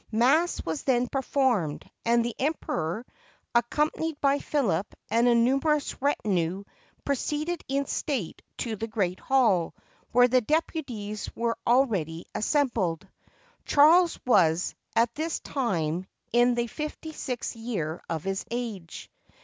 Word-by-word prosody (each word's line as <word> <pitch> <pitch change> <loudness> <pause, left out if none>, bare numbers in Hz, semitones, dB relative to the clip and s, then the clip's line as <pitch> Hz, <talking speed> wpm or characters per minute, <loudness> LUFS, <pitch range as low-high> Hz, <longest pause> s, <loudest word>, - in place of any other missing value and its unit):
Mass 275 +10 +2
was 160 -2 -2
then 250 -2 +2
performed; 255 - 0 0.2
and 235 0 +3
the 240 - -2
Emperor, 240 - -2 0.5
accom 240 +6 +2
panied 320 -2 -4
by 280 0 +3
Philip 205 - -1 0.2
and 235 +2 +4
a 240 - +5
numerous 275 +6 +1
retinue, 195 - 0 0.4
proceeded 300 +5 -1
in 275 +1 0
state 260 - -3 0.2
to 230 -3 -3
the 225 +2 -4
great 195 -5 -1
hall, 225 -11 +2 0.4
where 245 +1 +6
the 255 +1 +3
deputies 240 -7 -2
were 235 0 0
already 200 - +2
assembled. 220 - 0 0.6
Charles 330 +4 +5
was, 180 -8 +3 0.2
at 230 0 +3
this 315 +4 -2
time, 180 - -2 0.3
in 240 0 +4
the 240 0 0
fifty 305 +5 -6
sixth 250 -7 -4
year 205 -9 -3
of 160 -2 -2
his 195 +1 -2
age. 225 -8 -5
240 Hz, 125 wpm, -27 LUFS, 195-280 Hz, 0.6 s, where